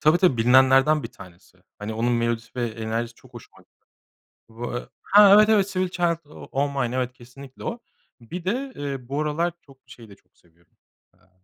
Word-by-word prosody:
Tabii, 155 Hz, +2 st, +4 dB
tabii 175 Hz, -8 st, +3 dB
bilinenlerden 130 Hz, +5 st, +4 dB
1 -, -, -6 dB
tanesi. 85 Hz, -2 st, -16 dB, 0.2 s
Hani, 105 Hz, +2 st, -5 dB
onun 120 Hz, +2 st, 0 dB
melodisi 115 Hz, -1 st, -1 dB
ve 120 Hz, -1 st, -1 dB
enerjisi 115 Hz, +1 st, -4 dB
çok 125 Hz, 0 st, -21 dB
hoşuma 120 Hz, -, -13 dB, 0.9 s
Voe 120 Hz, +2 st, -6 dB
Ha, 205 Hz, 0 st, +6 dB
evet, 215 Hz, +1 st, +6 dB
evet, 205 Hz, -3 st, +4 dB
"Sweet 185 Hz, -1 st, -2 dB
Child 175 Hz, -2 st, +1 dB
O 150 Hz, -, -13 dB
O' 140 Hz, +2 st, 0 dB
Mine" 120 Hz, +1 st, -3 dB
evet 125 Hz, -1 st, -2 dB
kesinlikle 130 Hz, +2 st, -14 dB
o. 235 Hz, +1 st, -4 dB, 0.4 s
Bir 170 Hz, +10 st, -8 dB
de, 260 Hz, +8 st, -2 dB
eee, 135 Hz, -3 st, -5 dB
bu 140 Hz, +2 st, -1 dB
aralar 160 Hz, +3 st, -1 dB
çok 135 Hz, -2 st, -20 dB
şeyi 115 Hz, -3 st, -14 dB
de 100 Hz, -, -14 dB
çok 90 Hz, -1 st, -36 dB
seviyorum. 85 Hz, 0 st, -31 dB, 0.4 s
Aaa, 90 Hz, -, -31 dB
130 Hz, 185 wpm, -24 LUFS, 115-165 Hz, 0.9 s, Ha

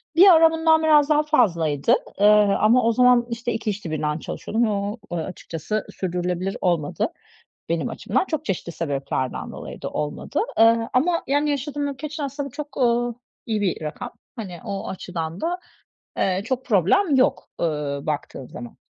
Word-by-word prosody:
Bir 375 Hz, +4 st, +8 dB
ara 325 Hz, -2 st, +7 dB
bundan 320 Hz, 0 st, +3 dB
biraz 300 Hz, -1 st, +5 dB
daha 300 Hz, 0 st, +4 dB
fazlaydı, 185 Hz, -, +2 dB, 0.3 s
ııı, 210 Hz, -1 st, +5 dB
ama 230 Hz, +4 st, +4 dB
o 230 Hz, -, +3 dB
zaman, 250 Hz, 0 st, +5 dB
işte, 235 Hz, 0 st, -3 dB
2 220 Hz, -1 st, -2 dB
işte 200 Hz, -5 st, -4 dB
birden 150 Hz, 0 st, -1 dB
çalışıyordum 225 Hz, +8 st, -2 dB
ve -, -, 0 dB
o 205 Hz, +2 st, -2 dB, 0.2 s
açıkçası 170 Hz, +4 st, -4 dB
sürdürülebilir 180 Hz, +1 st, -2 dB
olmadı 170 Hz, -5 st, 0 dB, 0.6 s
benim 165 Hz, -1 st, -1 dB
açımdan; -, -, -1 dB
çok 315 Hz, -4 st, -3 dB
çeşitli 175 Hz, -, -3 dB
sebeplerden 140 Hz, -5 st, -3 dB
dolayı -, -, -9 dB
da -, -, -3 dB
olmadı. 150 Hz, -, -3 dB, 0.2 s
Iıı, 230 Hz, 0 st, +5 dB
ama 335 Hz, +7 st, +2 dB
yani 290 Hz, +2 st, +1 dB
yaşadığım 285 Hz, +1 st, -2 dB
ülke 280 Hz, +2 st, -5 dB
için 305 Hz, +1 st, -6 dB
aslında 280 Hz, 0 st, -4 dB
çok, 290 Hz, +1 st, -8 dB
ııı, 240 Hz, -1 st, +2 dB, 0.3 s
iyi 220 Hz, -2 st, -1 dB
bir 185 Hz, -5 st, -1 dB
rakam. 150 Hz, 0 st, -5 dB, 0.2 s
Hani 185 Hz, -7 st, -7 dB
o 195 Hz, -1 st, -4 dB
açıdan 170 Hz, -2 st, -5 dB
da, 350 Hz, +2 st, -2 dB, 0.6 s
eee, 185 Hz, 0 st, +1 dB
çok 260 Hz, +2 st, -2 dB
problem 265 Hz, -, +3 dB
yok, 260 Hz, -, +2 dB
ııı, 150 Hz, -3 st, -2 dB
baktığın 145 Hz, -3 st, -4 dB
zaman. 120 Hz, -1 st, -10 dB
220 Hz, 160 wpm, -23 LUFS, 170-285 Hz, 0.6 s, Bir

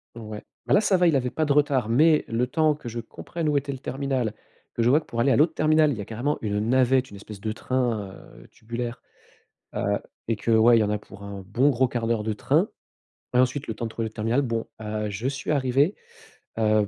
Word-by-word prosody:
Ouais. 110 Hz, -2 st, -8 dB, 0.2 s
Bah, -, -, +1 dB
là, 205 Hz, -, +6 dB
ça 195 Hz, -3 st, +3 dB
va, 175 Hz, -1 st, +4 dB
il 155 Hz, -, +3 dB
avait 125 Hz, -1 st, +1 dB
pas 155 Hz, +4 st, -1 dB
de 145 Hz, -, +2 dB
retard, 140 Hz, -5 st, +2 dB
mais 150 Hz, +6 st, +4 dB
le 115 Hz, +2 st, 0 dB
temps 155 Hz, +3 st, +2 dB
que 130 Hz, -5 st, -8 dB
je 115 Hz, +1 st, -5 dB
comprenne 160 Hz, +7 st, -5 dB
où 150 Hz, -1 st, +2 dB
était 140 Hz, 0 st, -2 dB
le 135 Hz, -, -5 dB
terminal, 130 Hz, -4 st, -2 dB, 0.4 s
que 115 Hz, -, 0 dB
je 120 Hz, -, +4 dB
voie 145 Hz, +5 st, +5 dB
que -, -, -14 dB
pour 115 Hz, -, -5 dB
aller 135 Hz, +2 st, +3 dB
à -, -, +4 dB
l'autre 155 Hz, +2 st, +4 dB
terminal, 155 Hz, -1 st, +3 dB
il 120 Hz, -, -3 dB
y 105 Hz, -, -4 dB
a -, -, -6 dB
carrément 120 Hz, +8 st, -2 dB
une 105 Hz, -1 st, -1 dB
navette, 130 Hz, 0 st, +3 dB
une 100 Hz, -, -10 dB
espèce 105 Hz, 0 st, -10 dB
de 110 Hz, +2 st, -3 dB
train, 120 Hz, -5 st, -1 dB, 0.3 s
heu, -, -, -17 dB
tubulaire, 120 Hz, +2 st, -6 dB, 0.7 s
heu, 100 Hz, 0 st, 0 dB, 0.3 s
et 115 Hz, -, +2 dB
que, 110 Hz, -, -3 dB
ouais, 115 Hz, +1 st, +6 dB
il -, -, +3 dB
y -, -, +3 dB
en 105 Hz, -, -1 dB
a 105 Hz, -, 0 dB
pour 100 Hz, -1 st, -14 dB
un 100 Hz, -1 st, -7 dB
bon 130 Hz, +9 st, +2 dB
gros 130 Hz, 0 st, +2 dB
1/4 120 Hz, -2 st, -1 dB
d'heure 110 Hz, -2 st, 0 dB
de 110 Hz, -, -1 dB
train. 105 Hz, -, +1 dB, 0.7 s
Et -, -, +5 dB
ensuite, 130 Hz, +2 st, +1 dB
le 110 Hz, -, -2 dB
temps 115 Hz, +2 st, -5 dB
de -, -, -3 dB
trouver 115 Hz, +1 st, -3 dB
l'autre 110 Hz, -, -7 dB
terminal, 115 Hz, +5 st, +1 dB
bon, 115 Hz, -4 st, -2 dB, 0.2 s
heu, 105 Hz, 0 st, -3 dB
je 105 Hz, +5 st, -3 dB
suis 140 Hz, +2 st, -3 dB
arrivé, 140 Hz, +5 st, +2 dB, 0.6 s
heu, 110 Hz, -1 st, +3 dB
120 Hz, 255 wpm, -25 LUFS, 110-140 Hz, 0.7 s, là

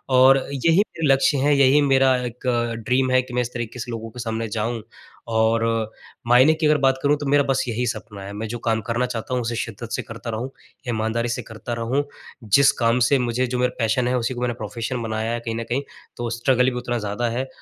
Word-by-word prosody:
और 130 Hz, +1 st, +7 dB, 0.2 s
यही 165 Hz, +5 st, +2 dB
मेरे 165 Hz, -6 st, 0 dB
लक्ष्य 135 Hz, +1 st, +2 dB
हैं, 145 Hz, +2 st, +3 dB
यही 140 Hz, +1 st, +5 dB
मेरा 135 Hz, -2 st, +4 dB
एक 125 Hz, +1 st, -7 dB
अ, 120 Hz, -1 st, +1 dB
ड्रीम 125 Hz, +3 st, 0 dB
है, 130 Hz, 0 st, +4 dB
कि 125 Hz, 0 st, -11 dB
मैं 125 Hz, -, +1 dB
इस 120 Hz, 0 st, -4 dB
तरीक़े 120 Hz, 0 st, -5 dB
से 120 Hz, +1 st, -5 dB
लोगों 115 Hz, -1 st, -5 dB
के 125 Hz, -, -11 dB
सामने 115 Hz, -1 st, -3 dB
जाऊँ 115 Hz, +2 st, -2 dB, 0.5 s
और 110 Hz, +1 st, +3 dB, 0.6 s
मायने 125 Hz, +6 st, +6 dB
की 160 Hz, 0 st, -2 dB
अगर 150 Hz, 0 st, +4 dB
बात 135 Hz, -1 st, +2 dB
करूँ 145 Hz, +1 st, +4 dB
तो 145 Hz, -, -6 dB
मेरा 145 Hz, +1 st, +3 dB
बस 135 Hz, -1 st, +1 dB
यही 120 Hz, +1 st, -1 dB
सपना 105 Hz, -3 st, -5 dB
है, 100 Hz, +1 st, -7 dB
मैं 110 Hz, +2 st, -4 dB
जो 120 Hz, +2 st, -5 dB
काम 110 Hz, -1 st, 0 dB
करना 120 Hz, +2 st, 0 dB
चाहता 120 Hz, 0 st, -4 dB
हूँ 125 Hz, -, +1 dB
उसे 115 Hz, 0 st, -3 dB
शिद्दत 115 Hz, 0 st, -5 dB
से -, -, -1 dB
करता 115 Hz, +1 st, -8 dB
रहूँ, 115 Hz, +3 st, -3 dB, 0.4 s
ईमानदारी 115 Hz, +1 st, -1 dB
से 120 Hz, -, -2 dB
करता 115 Hz, +2 st, -7 dB
रहूँ। 120 Hz, +5 st, 0 dB, 0.4 s
जिस 135 Hz, +6 st, +5 dB
काम 115 Hz, +1 st, +3 dB
से 140 Hz, -, +4 dB
मुझे 125 Hz, +1 st, 0 dB
जो 125 Hz, 0 st, -2 dB
मेरा 125 Hz, 0 st, +1 dB
पैशन 115 Hz, +2 st, +1 dB
है, 125 Hz, -, +1 dB
उसी 120 Hz, +1 st, -1 dB
को 120 Hz, -, -6 dB
मैंने 125 Hz, -1 st, 0 dB
प्रोफ़ेशन 115 Hz, +2 st, -4 dB
बनाया 110 Hz, 0 st, -2 dB
है 120 Hz, -, -2 dB
कहीं 115 Hz, -1 st, -4 dB
न 115 Hz, -, -3 dB
कहीं, 125 Hz, +3 st, 0 dB, 0.4 s
तो 120 Hz, -1 st, -3 dB
स्ट्रगल 125 Hz, +2 st, +2 dB
भी 125 Hz, -, -5 dB
उतना 120 Hz, 0 st, -2 dB
ज़्यादा 105 Hz, +3 st, -2 dB
है 125 Hz, +3 st, -2 dB
120 Hz, 240 wpm, -22 LUFS, 115-130 Hz, 0.6 s, और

